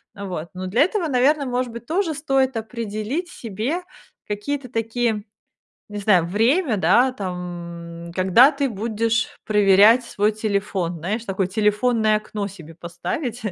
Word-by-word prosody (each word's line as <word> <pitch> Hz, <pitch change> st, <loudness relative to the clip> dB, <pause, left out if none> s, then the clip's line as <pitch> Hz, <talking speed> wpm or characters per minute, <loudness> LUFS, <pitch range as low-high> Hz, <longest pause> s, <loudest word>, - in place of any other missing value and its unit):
а, 200 Hz, -1 st, -7 dB
вот. 170 Hz, -3 st, -5 dB
Но 185 Hz, 0 st, -5 dB
для 220 Hz, +8 st, +2 dB
этого, 370 Hz, 0 st, -1 dB
наверное, 280 Hz, +2 st, +2 dB
может 250 Hz, -1 st, -2 dB
быть, 235 Hz, +1 st, -9 dB
тоже 335 Hz, +3 st, 0 dB
стоит 270 Hz, -4 st, 0 dB
определить 225 Hz, -, -4 dB
себе 235 Hz, -, -4 dB, 0.4 s
какие-то 255 Hz, +6 st, -3 dB
такие, 225 Hz, -2 st, -1 dB, 0.7 s
не 210 Hz, 0 st, -5 dB
знаю, 195 Hz, -5 st, +3 dB
время, 230 Hz, -, +2 dB
да, 250 Hz, +6 st, +4 dB
там, 170 Hz, -3 st, -7 dB
когда 190 Hz, +9 st, +6 dB
ты 275 Hz, -2 st, -1 dB
будешь 225 Hz, +1 st, 0 dB, 0.2 s
проверять 210 Hz, +3 st, +5 dB
свой 210 Hz, -2 st, 0 dB
телефон, 200 Hz, -5 st, -2 dB
знаешь, 205 Hz, +8 st, -3 dB
такое 190 Hz, -2 st, -1 dB
телефонное 215 Hz, +2 st, +2 dB
окно 210 Hz, -1 st, -5 dB
себе 165 Hz, -5 st, -12 dB
поставить, 225 Hz, -, -5 dB
215 Hz, 140 wpm, -22 LUFS, 195-250 Hz, 0.7 s, когда